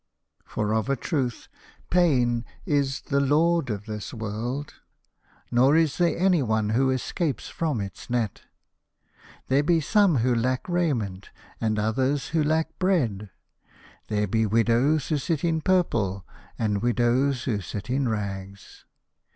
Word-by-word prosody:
For 105 0 -2
of 110 +3 0
a 140 - +2
truth, 130 - -2 0.4
pain 125 -10 +3 0.2
is 140 -2 0
the 140 - 0
Lord 155 +2 +2
of 105 -2 -4
this 105 +1 -6
world, 115 +6 -4 0.8
nor 130 +4 +4
is 160 -2 +2
there 175 -1 +2
anyone 130 - +2
who 130 +5 +2
escapes 130 +3 -2
from 155 -8 -2
its 100 +2 -7
net. 120 -4 -1 1.1
There 135 +2 +3
be 165 +2 +3
some 200 +2 +3
who 125 - +3
lack 125 +2 0
raiment, 125 - -1 0.3
and 110 -1 0
others 130 +6 0
who 160 -2 +1
lack 160 +2 0
bread. 125 - 0 0.8
There 105 -1 0
be 110 +2 +1
widows 120 +7 +2
who 155 -3 +1
sit 160 +1 -2
in 165 -2 +1
purple, 110 - +1 0.3
and 105 -3 0
widows 120 +2 +1
who 105 -5 -1
sit 100 +2 -6
in 130 0 0
rags. 100 -2 -6
125 Hz, 135 wpm, -25 LUFS, 110-155 Hz, 1.1 s, nor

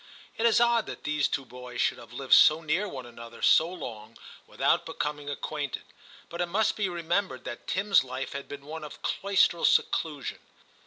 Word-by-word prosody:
It 230 - +2
is 230 - +4
odd 235 -1 +3
that - - -8
these 150 -1 +1
two 135 -3 -3
boys 125 0 -9
should - - +1
have 115 - -13
lived 130 +2 0
so 155 +2 +7
near 165 +6 0
one 130 -9 -7
another 115 0 -11
so 160 - +5
long 115 -10 -8 0.3
without - - +1
becoming 150 -1 -4
acquainted; 145 0 -4 0.4
but 170 +1 -5
it 175 - 0
must 205 +5 +1
be 200 -3 -1
remembered 175 -3 -2
that 120 - -8
Tim*s 200 -5 +3
life 130 +1 -5
had 140 0 -6
been 140 -1 -9
one 160 +1 -7
of 150 - -10
cloistral 195 -3 +2
seclusion. 150 -5 +1
150 Hz, 180 wpm, -28 LUFS, 130-180 Hz, 0.4 s, so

